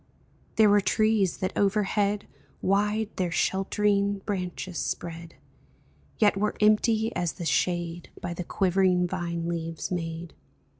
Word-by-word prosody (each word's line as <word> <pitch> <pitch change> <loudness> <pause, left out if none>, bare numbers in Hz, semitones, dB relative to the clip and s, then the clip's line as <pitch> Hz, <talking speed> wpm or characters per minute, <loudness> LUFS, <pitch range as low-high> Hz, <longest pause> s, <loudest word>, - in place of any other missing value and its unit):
There 220 -1 +6
were 205 0 +5
trees 215 -3 +2
that 185 - -3
overhead 205 0 +1 0.3
Wide 210 +2 +1
their 180 -2 0
sheltering 200 +2 +1
branches 180 -3 -3
spread, 170 0 -5 0.8
Yet 210 -2 +4
were 210 +2 0
empty 220 +1 +3
as 175 -2 -1
the 170 - -7
shade 170 +3 -1
By 175 - -4
the 180 - -4
quivering 185 -1 +2
vine 170 -2 -3
leaves 165 -1 -4
made. 165 -1 -4
190 Hz, 120 wpm, -27 LUFS, 170-205 Hz, 0.8 s, There